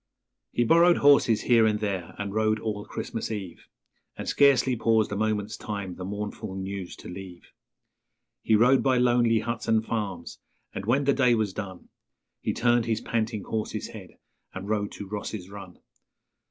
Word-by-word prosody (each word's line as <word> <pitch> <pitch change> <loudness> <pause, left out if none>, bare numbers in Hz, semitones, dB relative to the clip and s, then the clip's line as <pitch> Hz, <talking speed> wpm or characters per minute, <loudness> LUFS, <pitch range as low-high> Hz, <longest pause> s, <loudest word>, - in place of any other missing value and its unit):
'_ - - -58 0.5
He 120 - +1
borrowed 170 +7 +5
horses 140 -6 +5
here 115 -3 +4
and 105 -1 +1
there, 95 -5 -3
and 100 -1 -4
rode 110 0 +1
all 105 -1 -4
Christmas 110 - -5
Eve, 100 -6 -7 0.5
And - - -6
scarcely 135 -2 +4
paused 110 -2 +2
a - - -2
moment's 105 0 -1
time 100 -4 -5
the 90 - -8
mournful 105 +1 -5
news 95 -1 -5
to - - -12
leave; 90 -1 -10 0.9
He 110 - +3
rode 125 +5 +5
by 130 -2 +2
lonely 120 -2 +3
huts 115 0 -4
and 110 0 +2
farms, 100 -7 -4 0.3
and 100 - -6
when 135 +5 +3
the 140 0 +3
day 125 -3 +3
was 110 -4 -1
done 95 -3 -7 0.5
He - - -2
turned 120 -1 +2
his 110 -1 0
panting 110 -3 -2
horse's 110 -1 -4
head - - -11 0.4
and 95 +1 -6
rode 105 -1 -1
to 100 - -8
Ross's 100 -2 -6
Run. 100 -3 -10
110 Hz, 170 wpm, -26 LUFS, 100-115 Hz, 0.9 s, borrowed